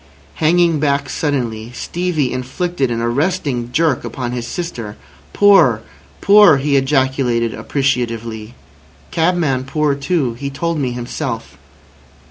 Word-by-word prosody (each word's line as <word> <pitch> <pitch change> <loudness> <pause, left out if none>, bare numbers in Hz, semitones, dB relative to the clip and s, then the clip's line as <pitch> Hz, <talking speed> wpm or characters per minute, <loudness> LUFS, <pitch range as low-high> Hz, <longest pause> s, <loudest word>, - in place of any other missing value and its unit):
Hanging 165 0 +3
back 140 -1 0
suddenly, 120 -6 -2
Stevie 165 -7 -2
inflicted 135 +3 -2
an 115 -1 -2
arresting 130 -2 -1
jerk 155 -1 +1
upon 120 +1 -4
his 120 -1 -4
sister. 120 -13 -5 0.3
"Poor! 175 - +5 0.4
Poor!" 200 -6 +7
he 140 +1 0
ejaculated 130 -4 +1
appreciatively. 115 -4 -2 0.6
"Cabman 160 -6 +1
poor 150 +1 0
too. 140 -3 -1
He 140 +4 -5
told 165 +3 -2
me 130 -3 0
himself." 120 - -5
135 Hz, 110 wpm, -17 LUFS, 120-160 Hz, 0.6 s, Poor